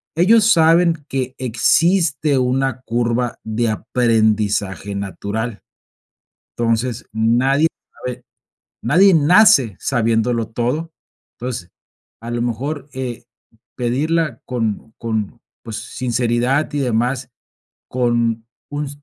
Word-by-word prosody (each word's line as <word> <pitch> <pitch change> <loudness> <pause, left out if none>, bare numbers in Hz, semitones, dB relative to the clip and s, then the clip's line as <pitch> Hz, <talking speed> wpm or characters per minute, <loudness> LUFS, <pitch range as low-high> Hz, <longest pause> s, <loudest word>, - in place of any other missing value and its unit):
Ellos 210 +6 +5
saben 165 -2 +4
que 130 -1 -3
existe 150 - +2
una 130 +1 0
curva 120 0 -1
de 110 +1 -1
aprendizaje 105 -4 0
natural. 100 +3 -4 1.0
Entonces, 115 +1 -1
nadie 125 +7 +2 0.3
sabe 125 -1 -7 0.6
nadie 185 - +5
nace 150 - +5
sabiéndolo 115 -1 0
todo. 125 +9 -2 0.5
Entonces, 120 -8 -5 0.5
a 115 +1 -7
lo 120 0 -1
mejor 140 +6 -3
eh, 125 -3 -5 0.5
pedirla 150 +6 0
con 115 -3 -3
con, 110 -1 -3 0.2
pues, 115 -3 -6
sinceridad 120 +4 0
y 145 - 0
demás, 125 +1 -1 0.6
con 120 -2 0 0.3
un 145 0 -3
125 Hz, 95 wpm, -19 LUFS, 115-140 Hz, 1.0 s, Ellos